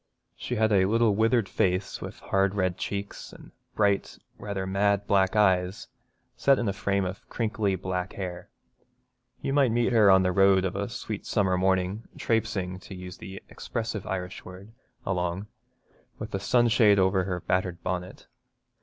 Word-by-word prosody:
She 125 - -4
had 110 -1 +2
a 95 -2 +4
little 115 +1 +3
withered 110 +1 +2
face, 90 +1 -1
with - - -8
hard 95 0 +1
red 95 -3 0
cheeks 100 +1 -5
and - - -14 0.2
bright, 100 -2 +1 0.2
rather 100 -2 -4
mad 100 +1 +1
black 95 0 +2
eyes, 95 -2 +2 0.5
set 140 -1 +3
in 115 - -1
a 100 - 0
frame 100 0 0
of 90 +2 -7
crinkly 110 -4 -1
black 95 0 -3
hair. 90 -3 -6 0.9
You 135 - -1
might 140 -4 +3
meet 120 +1 +1
her 110 -3 +6
on 95 0 +6
the 90 - +1
road 95 0 +4
of 95 - -2
a 100 +2 -2
sweet 110 -3 -6
summer 95 -3 +1
morning, 95 +3 0
trapesing, 105 -5 -1
to 95 - -10
use 90 0 -9
the 95 0 -9
expressive 110 -3 -5
Irish 90 -1 -4
word, 95 +4 -11 0.3
along, 90 +1 -2 0.7
with - - -7
a 95 - -1
sunshade 115 -2 +4
over 95 -1 +2
her 90 -2 -2
battered 90 0 -2
bonnet. 90 0 -4
95 Hz, 165 wpm, -27 LUFS, 95-105 Hz, 0.9 s, her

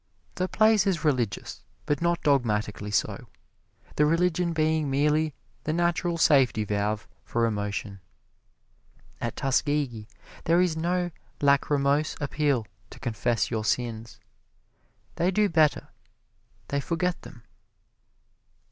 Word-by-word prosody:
The 185 - -1
place 215 0 +3
is 180 -5 0
religious, 125 -8 -1 0.2
but 145 +1 -1
not 170 0 0
dogmatically 110 -7 0
so 105 - -1 0.7
the 150 - +5
religion 170 +1 +1
being 155 -2 +1
merely 150 +2 +1 0.3
the 155 - 0
natural 175 0 0
safety 135 -8 +4
valve 105 +1 -2 0.2
for 115 0 0
emotion. 105 -2 -3 1.2
At 115 - -3
Tuskegee 135 -5 0 0.4
there 170 +2 +4
is 180 -3 +2
no 175 +2 -1 0.3
lacrimose 140 +1 +2
appeal 145 -5 0 0.2
to - - -13
confess 120 -1 -1
your 110 -1 -1
sins 115 0 -2 1.0
they 175 - +2
do 210 +2 +2
better 160 -4 +2 0.8
they 140 0 0
forget 175 +3 -1
them. 115 - -13
145 Hz, 110 wpm, -26 LUFS, 115-170 Hz, 1.2 s, the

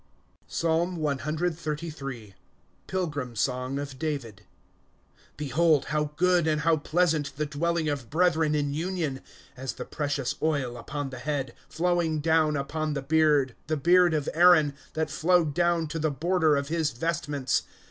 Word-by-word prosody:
PSALM 170 +2 0
cxxxiir. 150 - -3 0.5
Pilgrim 150 -10 -3
Song 125 +4 -1
of 140 -2 -6
David. 135 -10 -4 0.9
^ - - -38
Behold, 150 +1 +2
how 150 0 +2
good, 180 -1 +3
and 155 -1 +1
how 165 0 +3
pleasant, 155 -2 0
The 150 - 0
dweUing 155 +1 0
of 125 -6 -7
brethren 160 -2 +2
in 145 -1 0
union! 160 -4 -2
^ - - -24 0.3
As 130 +1 -4
the - - -7
precious 145 -3 -2
oil 145 -6 0
upon 140 +3 -5
the 130 - -7
head, 140 -1 -3 0.3
Mowing 170 -2 +1
down 155 -1 +2
upon 150 +2 -2
the 140 - -3
beard, 150 -3 +3
The 155 0 0
beard 175 +2 +4
of 150 -2 -1
Aaron, 165 -4 +6 0.2
That 155 -1 -1
flowed 165 -1 +2
down 170 0 +2
to 165 - -3
the 155 0 +1
border 160 +1 +2
of 140 0 -3
his 160 -2 +1
vestments 150 -1 -1
155 Hz, 150 wpm, -27 LUFS, 140-165 Hz, 0.9 s, Aaron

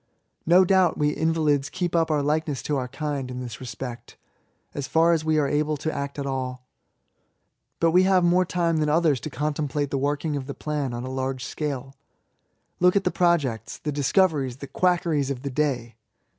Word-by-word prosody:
No 180 +3 +6
doubt 185 -2 +3
we 150 0 +2
invalids 155 -3 +1
keep 175 -1 -2
up 165 -1 +2
our 150 -2 +1
likeness 150 -1 -1
to 150 - -1
our 130 -2 -2
kind, 140 -1 -4
in 125 0 -5
this 120 -3 -7
respect, 120 -2 -7 0.6
as 140 - -4
far 165 +1 +4
as 160 -2 0
we 155 -1 +2
axe 145 -1 0
able 150 +1 +1
to 155 +3 -3
act 140 0 -4
at 140 - -3
all; 130 -2 -4 1.1
but 165 0 +3
we 180 +2 +5
have 185 -1 +4
more 175 +1 +4
time 170 -2 0
than 150 -1 +1
others 155 -3 +3
to 155 - -6
contemplate 145 -1 -2
the 140 - 0
working 145 +2 -1
of 135 -2 -4
the 140 - -5
plan 150 -4 -3
on 120 - -5
a - - -5
large 130 0 -3
scale« 135 -2 -4 0.9
Look 180 +1 +4
at 200 - +3
the - - +1
projects, 155 -10 0
the 150 - -4
dis^ 140 -2 -1
coveries, 150 -10 +2
the 140 - -7
quackeries 170 -4 +1
of 130 -2 -4
the 140 - -3
day 125 -5 -1
150 Hz, 200 wpm, -25 LUFS, 135-165 Hz, 1.1 s, No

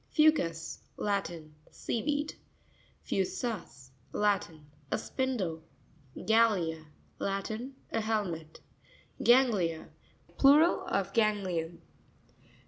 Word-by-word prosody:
Fou'cus.—Latin. 175 - 0 0.2
Sea 230 - -3
weed. 295 +2 -1 0.7
Fu'sus.—Latin. 165 - -2 0.2
<A - - +1
spindle. 215 -12 -2 0.6
Ga 225 0 +5
r's.—Latin. 195 - -4 0.2
A 225 - 0
helmet. 185 -8 -3 0.6
Gan'cuiA.—Plural 250 - +3
of - - -1
ganglion. 190 -7 0
200 Hz, 60 wpm, -31 LUFS, 165-235 Hz, 0.7 s, Ga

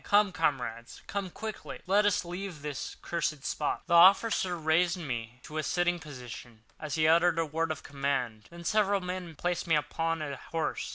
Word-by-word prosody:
Come, 205 -1 +4
comrades—come 160 - -2
quickly! 220 +4 -7
Let 205 +3 +4
us 200 -3 +1
leave 175 -3 -6
this 145 -3 -4
cursed 155 -4 -2
spot." 150 - -1
The 170 - -1
officer 185 +1 +6
raised 170 +3 +2
me 120 -7 -5
to 155 +1 -5
a - - +2
sitting 175 +3 +1
posture, 125 -6 -9 0.3
as 155 -3 -3
he 155 -1 +3
uttered 170 +1 +5
a 165 - +2
word 160 +2 -1
of 155 - -5
command; 135 -6 -2
then 170 0 -11
several 200 +2 +2
men 180 -2 -5
placed 175 +3 -2
me 165 - +4
upon 165 +1 -1
a 140 -2 -4
horse. 165 +3 -3
165 Hz, 175 wpm, -30 LUFS, 145-180 Hz, 0.3 s, officer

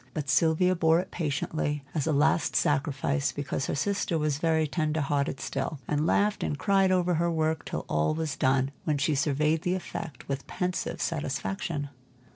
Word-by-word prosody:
But 145 -3 -3
Sylvia 165 +5 +3
bore 165 -1 +4
it 185 - -5
patiently 150 -1 -2
as 155 -2 -1
a - - +2
last 155 +2 +2
sacrifice, 140 0 +1
because 140 -2 -3
her - - -1
sister 195 +1 0
was 150 -2 0
very 160 -1 +2
tender 155 0 -1
hearted 140 -1 0
still, 155 - -3
and 150 +2 +1
laughed 205 +3 +2
and 150 - -1
cried 195 +1 +3
over 180 -1 +2
her 170 +1 +1
work 160 -1 0
till - - -4
all 75 - +1
was 160 -3 -2
done, 130 +1 +2
when 150 -2 0
she 140 +3 +1
surveyed 150 +2 +1
the 180 +2 0
effect 165 -4 -6
with 140 0 -4
pensive 180 0 -2
satisfaction. 145 - -2
155 Hz, 175 wpm, -28 LUFS, 140-165 Hz, -, bore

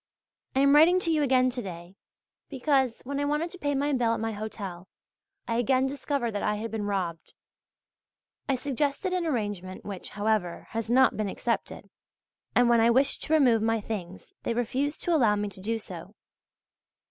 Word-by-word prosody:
I 265 - +4
am 280 0 +5
writing 340 +5 +6
to 335 - +1
you 310 -2 +2
again 255 -2 +3
to 245 - -4
day, 175 -1 -9 0.5
because, 265 -3 +1
when 280 +2 -3
I 285 - 0
wanted 300 +4 -1
to 370 - -9
pay 285 -3 -1
my 285 +2 0
bill 235 -3 +2
at - - -5
my 225 0 -2
hotel, 200 -4 -6 0.6
I 230 - 0
again 255 +2 +2
discovered 275 -3 -2
that 205 - -3
I 210 - 0
had 220 +1 -5
been 220 -2 -3
robbed. 180 -5 -3 1.1
I 270 - +3
suggested 285 +7 -1
an 355 -2 0
arrangement 205 - -3
which, 195 -3 -7
however, 205 -4 0
has 225 -1 -3
not 260 +2 +4
been 215 -2 -1
accepted, - - -3 0.7
and 245 0 +5
when 235 -1 +5
I 230 - +5
wished 265 +4 +3
to 315 - -1
remove 250 -8 +4
my 225 0 +1
things 190 -4 -7
they 235 - -2
refused 260 +5 -1
to 345 - +1
allow 230 -8 +4
me 205 0 -2
to 190 - -13
do 225 +4 -1
so. 220 - -10
235 Hz, 185 wpm, -27 LUFS, 210-280 Hz, 1.1 s, writing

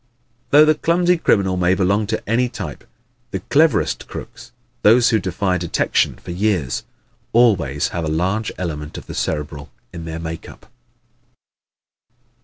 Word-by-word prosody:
Though 150 +2 +7
the 155 - +5
clumsy 175 +3 +2
criminal 95 - +2
may 90 +1 +3
belong 100 +3 +1
to 110 +1 -3
any 120 +3 +1
type, 95 - -7 0.4
the - - -3
cleverest 155 -3 +2
crooks - - -9 0.3
those 115 +3 +5
who 110 - +3
defy 95 0 -1
detection 85 -1 +1
for - - -10
years 90 -7 0 0.5
always 90 - +3
have 85 - -3
a 75 - -1
large 95 +7 -1
element 75 -4 -5
of - - -9
the - - -8
Cerebral 75 -1 -3 0.2
in 85 -2 -7
their 80 0 -5
makeup. 80 0 -8
95 Hz, 140 wpm, -20 LUFS, 80-115 Hz, 0.5 s, Though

